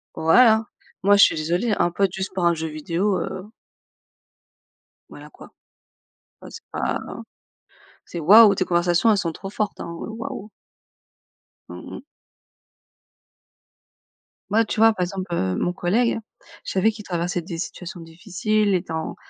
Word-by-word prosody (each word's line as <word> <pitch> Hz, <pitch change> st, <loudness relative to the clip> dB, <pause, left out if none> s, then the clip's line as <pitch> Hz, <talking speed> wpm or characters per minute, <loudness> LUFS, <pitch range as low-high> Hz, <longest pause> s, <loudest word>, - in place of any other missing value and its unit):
Voilà, 220 Hz, +7 st, +4 dB, 0.4 s
moi 200 Hz, +1 st, +5 dB
je 200 Hz, -, +7 dB
suis -, -, +4 dB
désolée, 175 Hz, +9 st, -1 dB
un -, -, +2 dB
pote 190 Hz, +1 st, 0 dB
juste 190 Hz, 0 st, -5 dB
pour 180 Hz, -2 st, -1 dB
un 170 Hz, -, +4 dB
jeu 160 Hz, 0 st, -4 dB
vidéo, 170 Hz, +6 st, -1 dB
heu 190 Hz, +3 st, -6 dB, 1.6 s
voilà -, -, -12 dB
quoi. -, -, -15 dB, 0.9 s
Ouais, -, -, -11 dB
c'est 455 Hz, -, -11 dB
pas -, -, -2 dB, 1.1 s
c'est, 170 Hz, -, -7 dB
waouh, 205 Hz, +5 st, +7 dB
tes 185 Hz, -, -1 dB
conversations, 175 Hz, +4 st, +2 dB
elles 210 Hz, -, +3 dB
sont 170 Hz, -4 st, -2 dB
trop 195 Hz, -, -8 dB
fortes, 210 Hz, 0 st, -3 dB
hein, -, -, -5 dB, 0.2 s
heu, -, -, -6 dB
waouh. 220 Hz, -2 st, -7 dB, 1.2 s
Mmh -, -, -9 dB
mh. -, -, -9 dB, 2.5 s
Moi, 225 Hz, +3 st, +2 dB
tu 215 Hz, -, -4 dB
vois? 225 Hz, 0 st, +6 dB
Par 185 Hz, -, -2 dB
exemple, 185 Hz, -1 st, -5 dB
heu, 95 Hz, -, -1 dB
mon 175 Hz, -, -1 dB
collègue, 225 Hz, +8 st, 0 dB, 0.5 s
je -, -, -4 dB
savais 195 Hz, +4 st, +2 dB
qu'il 210 Hz, -1 st, -11 dB
traversait 175 Hz, 0 st, -2 dB
des 170 Hz, 0 st, -7 dB
situations 175 Hz, 0 st, -7 dB
difficiles 195 Hz, +5 st, -1 dB
étant, 160 Hz, -3 st, -4 dB
185 Hz, 145 wpm, -22 LUFS, 170-210 Hz, 2.5 s, je